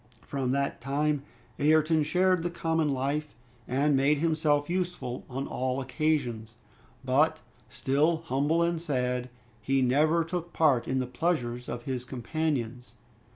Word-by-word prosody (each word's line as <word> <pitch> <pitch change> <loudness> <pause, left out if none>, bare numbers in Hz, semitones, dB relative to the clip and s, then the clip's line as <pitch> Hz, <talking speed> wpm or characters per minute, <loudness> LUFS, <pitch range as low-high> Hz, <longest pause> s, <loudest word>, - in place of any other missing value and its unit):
From 135 -2 -2
that 140 -2 -1
time 145 +3 0 0.4
Ayrton 155 +2 +4
shared 180 +3 +2
the 175 - -1
common 160 -2 0
life, 140 +3 -2 0.3
and 140 +3 +2
made 140 +3 +3
himself 150 -2 +1
useful 175 -8 -3
on 135 +2 -3
all 130 +1 -2
occasions; 130 -5 -1 0.5
but 155 +5 +3 0.3
still 155 +8 +1
humble 150 +5 +1
and 170 -1 0
sad, 125 -5 -1 0.3
he 135 +3 +1
never 155 +6 +3
took 175 +1 -5
part 145 -7 +3
in 130 - 0
the 130 - 0
pleasures 125 -4 -2
of 120 0 -5
his 130 -2 -3
companions. 125 -1 -3
145 Hz, 135 wpm, -28 LUFS, 130-160 Hz, 0.5 s, Ayrton